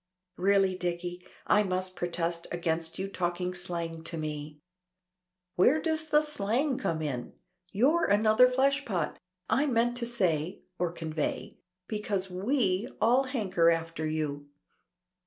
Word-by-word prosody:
"Really, 195 0 +3
Dicky, 175 0 -3 0.2
I 210 - +4
must 185 -1 -2
protest 170 -1 -2
against 165 -1 -1
your 190 - -2
talking 180 -1 -2
slang 170 -2 -2
to 165 0 -3
me." 150 -1 -5 1.0
"Where 255 - +5
does 315 0 -1
the 300 +1 +4
slang 265 0 0
come 160 -1 -1
in? 125 -5 -4 0.4
You're 290 +11 +3
another 215 +4 +5
fleshpot. 260 - 0 0.3
I 290 +3 +2
meant 240 -1 +2
to 235 -1 -3
say 180 -8 -1 0.2
or 175 -1 0
convey 160 -3 -4 0.3
because 205 -3 -3
we 200 0 +1
all 245 +5 +4
hanker 195 -10 +2
after 165 -1 -1
you." 150 -2 -3
185 Hz, 125 wpm, -29 LUFS, 165-235 Hz, 1.0 s, Where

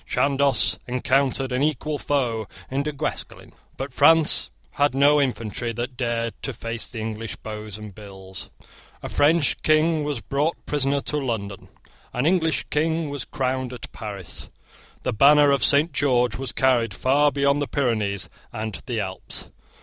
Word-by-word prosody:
Chandos 140 0 +2
encountered 135 +1 +1
an 125 +1 0
equal 150 0 0
foe 120 -7 0 0.2
in 135 +1 0
Du 150 +1 -2
Guesclin. 140 - -5 0.2
But - - -5
France 165 -1 +5 0.2
had 145 -2 +1
no 145 +2 +5
infantry 115 -2 -2
that 120 +3 -4
dared 115 -2 -1
to - - -3
face 115 0 -4
the 115 - -9
English 110 0 -4
bows 105 -2 -7
and 105 -2 -9
bills. 95 -3 -8 0.5
A - - -4
French 150 0 +2
King 155 0 +3
was 145 -4 -2
brought 145 +7 -1
prisoner 140 -1 0
to 150 - -2
London. 110 -8 -3 0.5
An 125 +3 0
English 165 -2 +2
King 160 0 0
was 145 - -5
crowned 130 -2 -2
at 125 - -8
Paris. 100 -6 -7 0.5
The - - -1
banner 145 +4 +6
of 140 - +2
St. 150 +4 +5
George 125 -5 +2
was 130 0 -4
carried 125 -3 +2
far 145 +3 +3
beyond 140 +1 +2
the 145 - -1
Pyrenees 110 -7 0 0.2
and 110 -2 -5
the 120 -3 -1
Alps. 95 -2 -4
130 Hz, 155 wpm, -24 LUFS, 115-145 Hz, 0.5 s, banner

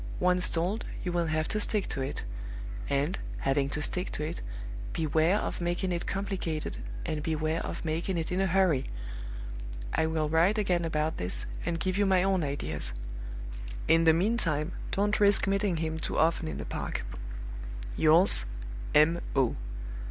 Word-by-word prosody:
Once 180 0 +3
told, 180 +7 0 0.2
you 180 - -1
will 170 -1 +1
have 155 0 0
to 215 - 0
stick 210 -1 +3
to 135 - -2
it; 135 +2 -3 0.7
and, 145 +7 +1 0.2
having 135 0 +2
to 150 +1 -1
stick 180 +4 0
to 150 - -3
it, 160 +3 -4 0.5
beware 160 +4 +3
of 210 - -3
making 175 +2 0
it 170 -1 -2
complicated, 190 -5 -2 0.3
and 155 - -2
beware 155 +1 0
of - - -5
making 165 +3 -1
it 165 0 -2
in 185 +1 +1
a 195 - +3
hurry. 180 -7 +3 1.0
I 160 - +2
will 160 -1 0
write 165 +7 +3
again 180 -5 +1
about 155 -1 0
this, 90 +1 +2 0.2
and 170 -1 0
give 185 +2 0
you 205 - +4
my 185 -1 +4
own 190 -3 +2
ideas. 80 - -3 0.9
In 165 +1 +5
the 160 - +8
meantime, 170 -4 +1 0.2
don't 205 +2 +1
risk 205 -1 +5
meeting 195 -2 +1
him 160 0 -2
too - - -3
often 165 0 +3
in - - -4
the - - -5
park. - - -3 0.9
"Yours, 165 +5 +6 0.5
M. 160 +3 +6 0.2
O." 130 -4 +3
165 Hz, 165 wpm, -30 LUFS, 155-190 Hz, 1.0 s, the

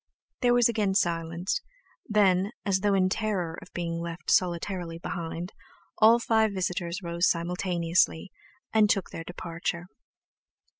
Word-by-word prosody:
There 245 -1 +4
was 245 -1 +5
again 210 -4 0
silence; 170 0 0 0.5
then, 200 -2 +3
as 195 -2 +2
though 200 0 +2
in 185 -1 +3
terror 185 -5 -2
of - - -14
being 170 -1 -3
left 170 0 -4
solitarily 175 -1 0
behind, 170 +1 -5 0.5
all 225 +2 +7
five 220 -3 +2
visitors 180 0 -2
rose 170 +1 +1
simultaneously, 170 0 0 0.4
and 215 -2 +5
took 195 -3 0
their 165 - -6
departure. 170 0 -4
180 Hz, 130 wpm, -27 LUFS, 170-205 Hz, 0.5 s, all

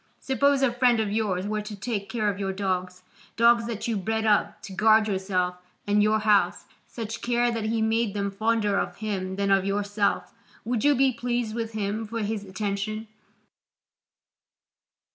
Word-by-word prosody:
Suppose 275 +1 +2
a 260 - +4
friend 245 -1 +3
of 215 -2 0
yours 200 -4 -1
were 215 +1 -2
to 210 0 -7
take 200 -1 -4
care 220 -3 -1
of 200 -1 -1
your 195 -1 -1
dogs, 185 -2 -3 0.3
dogs 235 0 +4
that 230 -1 -4
you 230 -2 0
bred 220 +3 -1
up 210 -1 +2
to 195 - -8
guard 215 +2 +4
yourself 190 -2 -1 0.3
and 205 0 +3
your 215 +1 +3
house, 210 -2 +2 0.2
such 225 -1 -6
care 240 0 +1
that 225 -2 -3
he 220 0 0
made 220 -1 +1
them 200 -1 -1
fonder 215 0 +1
of - - -3
him 190 -3 -3
than 200 0 0
of 195 -1 +4
yourself, 205 +1 -1 0.3
would 235 0 -1
you 290 0 +5
be 265 0 +3
pleased 240 -2 -2
with 225 -1 -4
him 215 +1 -2
for 230 +1 -4
his 210 0 -2
attention? 205 +2 -4
215 Hz, 175 wpm, -26 LUFS, 200-230 Hz, 0.3 s, you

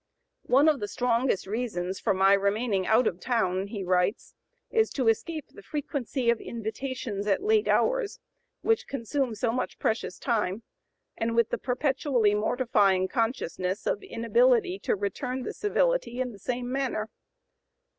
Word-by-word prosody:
"One 275 +5 +5
of 300 -3 +3
the 205 - -3
strongest 240 -2 0
reasons 195 -4 -3
for - - +1
my 195 +1 +5
remaining 200 0 +1
out 220 +3 +4
of 185 -5 -1
town," 190 -5 0
he 200 -1 -5
writes, 180 +4 0 0.4
"is 445 -1 +3
to 260 -5 0
escape 310 +7 -2
the - - -14
frequency 270 -1 -1
of 235 - -2
invitations 225 -2 -4
at 205 - +1
late 430 0 +3
hours, - - +1 0.4
which 450 -1 +1
consume 265 -1 -2
so 225 +2 0
much 250 - -3
precious 220 -4 -1
time, 220 -3 -1 0.5
and 230 0 -1
with 235 -1 +3
the - - -1
perpetually 255 -4 +1
mortifying 210 -4 +2
consciousness 205 -4 -2
of 205 - 0
inability 395 - +2
to - - 0
return 250 +6 -3
the - - -4
civility - - 0
in 255 -1 -1
the 205 - -13
same 245 +3 -3
manner." 260 -5 -1
235 Hz, 150 wpm, -27 LUFS, 205-270 Hz, 0.5 s, One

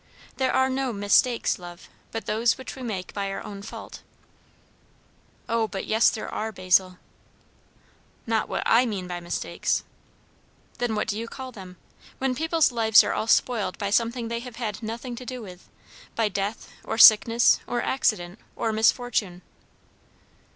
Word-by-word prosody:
"There 260 -1 +1
are 260 0 +3
no 265 -1 -1
mistakes, 205 +3 +2
love, 175 0 -11 0.2
but 225 - -5
those 225 +2 +1
which 260 - -8
we 265 - -10
make 200 -7 -5
by 200 -1 -3
our 195 - -5
own 200 -1 -8
fault." 205 - -9 1.5
"O 230 -1 +1
but 195 -2 -5
yes 220 +2 +4
there 220 - -5
are, 220 +1 -4
Basil!" 185 -1 +2 1.3
"Not 225 -1 0
what - - -2
I 245 +3 +4
mean 200 -5 -4
by 175 -1 -4
mistakes." 175 0 -2 1.0
"Then 240 -3 -1
what 210 - -1
do 210 - -2
you 230 - -5
call 260 +1 -8
them? 185 -5 -11 0.4
When 265 -1 0
people's 320 +1 +2
lives 225 -2 +5
are - - -1
all 220 - -2
spoiled 230 -2 +1
by 200 -2 -3
something 230 +2 0
they 235 0 -3
have 245 -1 -9
had 220 -3 -4
nothing 235 +2 -5
to 255 - -7
do 250 +1 -6
with 180 -3 -12 0.5
by 225 -2 +1
death, 200 +2 -4
or 225 - -4
sickness, 230 +2 +7
or 240 - -1
accident, 215 -7 0 0.2
or 225 - -1
misfortune." 220 -5 +1
225 Hz, 160 wpm, -25 LUFS, 200-245 Hz, 1.5 s, sickness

